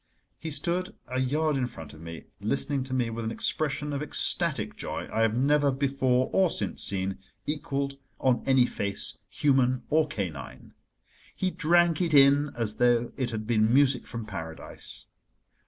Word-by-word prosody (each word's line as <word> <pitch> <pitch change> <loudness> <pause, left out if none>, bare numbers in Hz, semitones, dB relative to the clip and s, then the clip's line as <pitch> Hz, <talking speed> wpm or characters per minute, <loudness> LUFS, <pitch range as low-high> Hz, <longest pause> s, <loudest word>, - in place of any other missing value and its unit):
He 160 - -5
stood 175 +5 -2
a 130 +1 -2
yard 150 +4 +1
in 125 -2 0
front 80 -11 -10
of 80 - -13
me, 85 0 -8 0.2
listening 135 +6 0
to 130 - -6
me 120 -3 0
with 115 0 -4
an 110 - -2
expression 150 +4 -1
of 140 - -2
ecstatic 150 - +1
joy - - -5
I 110 - +1
have 115 0 +2
never 145 +2 +3
before 130 -2 +1
or 190 -2 +4
since 100 - -2
seen 95 0 0 0.3
equalled 140 -2 -3 0.2
on 130 -2 +2
any 130 -2 +5
face, 100 -4 -3
human 130 -3 +2
or 155 0 +4
canine. 95 - -6 0.6
He 185 -1 -1
drank 175 0 +3
it 165 -4 +2
in 140 +1 +6
as 115 -3 -2
though 120 -1 +3
it 130 -3 -1
had 110 -2 -4
been 110 -1 +2
music 135 -1 +3
from 115 -2 -6
Paradise. 80 -5 -4
130 Hz, 165 wpm, -27 LUFS, 115-145 Hz, 0.6 s, in